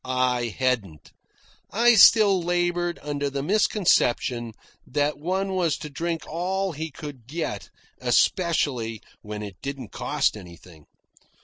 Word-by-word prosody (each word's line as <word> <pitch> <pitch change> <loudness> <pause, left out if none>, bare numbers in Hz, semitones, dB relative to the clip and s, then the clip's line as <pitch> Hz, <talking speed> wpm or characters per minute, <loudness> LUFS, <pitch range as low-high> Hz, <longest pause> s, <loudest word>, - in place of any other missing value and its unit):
I 125 -1 0
hadn't. 105 - -2 0.6
I 240 +4 +4
still 205 -3 +7
laboured 175 0 0
under 145 -1 -2
the 140 0 -3
misconception 135 - +1 0.3
that 145 +1 -1
one 190 +4 -1
was 175 -5 +1
to 150 - -8
drink 165 +3 -3
all 190 +4 -2
he 160 +1 -5
could 140 -5 -10
get 160 +4 -4 0.3
especially 130 - +1 0.2
when 105 0 -6
it 100 -3 -9
didn't 135 -5 -6
cost - - 0
anything. 85 -5 -13
145 Hz, 120 wpm, -25 LUFS, 125-175 Hz, 0.6 s, still